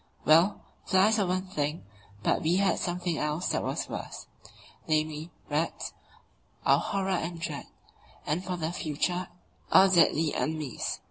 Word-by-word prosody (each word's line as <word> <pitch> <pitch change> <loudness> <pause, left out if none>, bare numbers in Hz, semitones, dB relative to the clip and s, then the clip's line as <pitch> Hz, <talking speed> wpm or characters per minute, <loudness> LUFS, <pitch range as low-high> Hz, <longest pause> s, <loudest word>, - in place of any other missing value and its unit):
Well, 165 +6 +5 0.2
flies 210 +3 +4
are 195 - +2
one 185 +1 0
thing, 150 - -3 0.4
but - - +2
we 165 +3 +2
had 190 -2 +2
something 175 -2 -2
else 150 +4 -1
that - - 0
was - - -2
worse - - -6 0.6
namely, 155 0 0 0.2
rats 155 +3 -2 0.7
our - - +5
horror 195 -1 -2
and 170 -1 -2
dread, - - -5 0.6
and 160 +5 -1
for 180 -1 -3
the 160 -1 -2
future 175 +2 -1 0.4
our 195 - +8
deadly 165 -3 +4
enemies. 155 -5 -2
170 Hz, 140 wpm, -29 LUFS, 155-185 Hz, 0.7 s, our